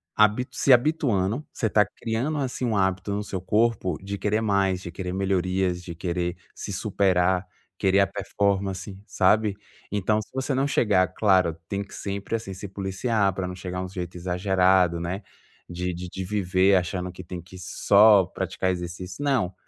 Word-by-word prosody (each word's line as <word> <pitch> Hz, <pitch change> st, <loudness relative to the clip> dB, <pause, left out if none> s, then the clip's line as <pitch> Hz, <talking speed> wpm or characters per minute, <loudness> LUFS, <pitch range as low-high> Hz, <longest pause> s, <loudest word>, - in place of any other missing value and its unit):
habi 105 Hz, +4 st, +3 dB
se 135 Hz, -, +4 dB
habituando, 125 Hz, -3 st, +1 dB
você 115 Hz, -, 0 dB
está 105 Hz, -1 st, +4 dB
criando 120 Hz, +7 st, -3 dB
assim 130 Hz, -2 st, -2 dB
um 115 Hz, -3 st, 0 dB
hábito 95 Hz, +1 st, 0 dB
no 105 Hz, +1 st, -2 dB
seu 95 Hz, -2 st, -4 dB
corpo 100 Hz, -3 st, +1 dB
de 100 Hz, +1 st, -5 dB
querer 105 Hz, +2 st, 0 dB
mais, 100 Hz, -3 st, +1 dB
de 85 Hz, -, -7 dB
querer 90 Hz, 0 st, -5 dB
melhorias 95 Hz, -1 st, 0 dB
de 85 Hz, -, -7 dB
querer 85 Hz, +1 st, -2 dB, 0.2 s
se 100 Hz, -, -6 dB
superar, 95 Hz, -2 st, +1 dB, 0.3 s
querer 95 Hz, +1 st, +3 dB
a 100 Hz, -, +4 dB
performance, 100 Hz, -1 st, -2 dB
sabe? 100 Hz, +1 st, +2 dB, 0.4 s
Então 105 Hz, +1 st, +1 dB
se 110 Hz, -, -8 dB
você 130 Hz, +1 st, -1 dB
não 135 Hz, +2 st, +1 dB
chegar, 100 Hz, -9 st, +3 dB
claro, 95 Hz, -6 st, +3 dB
tem 100 Hz, 0 st, -2 dB
que 100 Hz, -, -15 dB
sempre, 100 Hz, +2 st, -4 dB
assim, 110 Hz, -3 st, -5 dB
se 100 Hz, +2 st, -7 dB
policiar 100 Hz, +2 st, 0 dB
para 95 Hz, -2 st, -2 dB
não 90 Hz, -, -6 dB
chegar 90 Hz, 0 st, -5 dB
um -, -, -4 dB
jeito 90 Hz, -1 st, -6 dB
exagerado, 90 Hz, -1 st, +2 dB
né, 90 Hz, +4 st, -3 dB, 0.5 s
de 90 Hz, +1 st, -3 dB
de 90 Hz, +1 st, -6 dB
de 95 Hz, -, -5 dB
viver 95 Hz, -1 st, +2 dB
achando 90 Hz, +1 st, -2 dB
que 90 Hz, +1 st, -10 dB
tem 90 Hz, +1 st, -7 dB
que 90 Hz, +2 st, -12 dB
só 100 Hz, +3 st, +5 dB
praticar 95 Hz, +2 st, -2 dB
exercício 90 Hz, -, -5 dB
não, 125 Hz, -11 st, +1 dB
95 Hz, 175 wpm, -25 LUFS, 90-105 Hz, 0.5 s, só